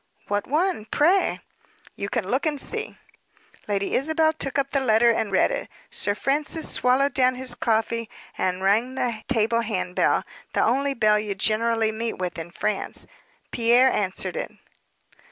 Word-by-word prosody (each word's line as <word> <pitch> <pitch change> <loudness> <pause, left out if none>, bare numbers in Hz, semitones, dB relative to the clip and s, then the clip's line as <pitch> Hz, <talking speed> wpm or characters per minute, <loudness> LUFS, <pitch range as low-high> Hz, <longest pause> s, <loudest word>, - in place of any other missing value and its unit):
"What 205 0 -1
one, 310 - 0
pray?" 345 - +2 0.5
"You 200 - -4
can 230 -5 -2
look 260 +9 0
and 295 -2 -1
see." - - -3 0.7
Lady 200 -1 -1
Isabel 315 +3 +2
took 275 -3 -3
up 275 0 0
the 275 - +1
letter 235 -2 +4
and 220 -2 -1
read 190 - +3
it. - - -4 0.2
Sir 205 - +1
Francis 295 +6 +1
swallowed 260 +3 +2
down 255 -1 +3
his 255 -1 -1
coffee, 230 -1 -1 0.3
and 185 0 -1
rang 225 +7 +2
the 235 -4 -2
table 230 -1 +1
hand 200 -5 -3
bell - - +2 0.3
the - - +2
only 275 +4 +1
bell 215 -2 +3
you 210 -2 -3
generally 220 +2 +1
meet 225 +1 -4
with 180 -2 -4
in 165 +1 -7
France. 205 +3 -2 0.5
Pierre 240 +2 +4
answered 190 - -1
it. - - -4
230 Hz, 160 wpm, -24 LUFS, 210-275 Hz, 0.7 s, letter